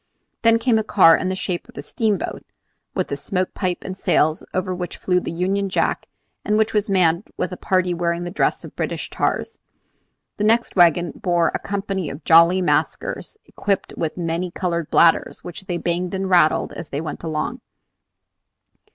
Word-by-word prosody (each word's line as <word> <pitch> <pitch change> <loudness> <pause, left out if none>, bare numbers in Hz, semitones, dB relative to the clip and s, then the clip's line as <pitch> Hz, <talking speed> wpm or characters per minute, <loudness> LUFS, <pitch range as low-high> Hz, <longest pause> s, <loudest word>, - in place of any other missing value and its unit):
Then 230 0 +5
came 230 -1 +2
a - - -1
car 185 -6 +6
in 185 - -2
the 185 - -1
shape 185 +3 -4
of 245 - -17
a - - -5
steamboat, 215 -4 -2 0.5
with - - -2
a - - 0
smoke 185 -2 -2
pipe 180 -3 -2
and 190 - -5
sails, 155 -4 +1
over 185 0 -1
which 180 -1 -5
flew 180 -1 +1
the - - -5
Union 195 +4 -1
Jack, - - 0 0.4
and 210 0 +1
which 220 +1 +1
was 210 0 0
manned 180 -1 +2
with 180 - -2
a - - -4
party 185 -1 0
wearing 170 0 -1
the 175 - -5
dress 200 - 0
of - - -11
British - - -3
tars. 455 - -2 0.8
The 210 - -2
next 230 +3 +2
wagon 175 -2 +4
bore 175 -2 +1
a - - -1
company 195 -4 -3
of 140 - -8
jolly 170 +3 +6
maskers 435 - -1
equipped 200 -2 -2
with 160 0 -3
many 170 +1 -2
colored 170 -2 -2
bladders, 165 -1 +3
which 175 +2 -8
they 175 -2 -2
banged 175 +2 -2
and 190 0 -2
rattled 175 -4 +3
as 165 - -8
they 140 - -3
went 155 -1 -5
along. 165 +10 -3
180 Hz, 185 wpm, -21 LUFS, 170-195 Hz, 0.8 s, car